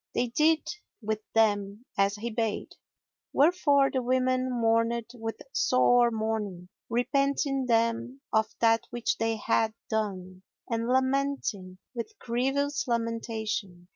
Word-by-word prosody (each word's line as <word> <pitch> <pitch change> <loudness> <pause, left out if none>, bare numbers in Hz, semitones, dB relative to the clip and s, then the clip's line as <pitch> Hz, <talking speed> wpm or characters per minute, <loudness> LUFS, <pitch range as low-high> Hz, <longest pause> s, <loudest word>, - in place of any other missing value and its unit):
They 245 0 +1
did 310 +5 +2 0.4
with 215 0 -1 0.2
them 205 0 +1
as 200 +1 +2
he 230 +3 -4
bade; 225 -1 -2 0.6
wherefore 285 -3 +4
the 260 - 0
women 255 +1 +1
mourned 230 0 +1
with 225 -2 -5
sore 245 -1 +4
mourning, 215 -5 -3 0.2
repenting 275 +2 +1
them 230 +3 +1
of 220 0 +3
that 225 -1 +3
which 225 -3 -2
they 225 0 +1
had 220 +1 +1 0.2
done 185 -4 -3 0.3
and 230 -1 -1
lamenting 260 -7 0 0.2
with 250 - -6
grievous 275 +4 -1
lamentation. 225 -6 -3
230 Hz, 115 wpm, -28 LUFS, 220-255 Hz, 0.6 s, wherefore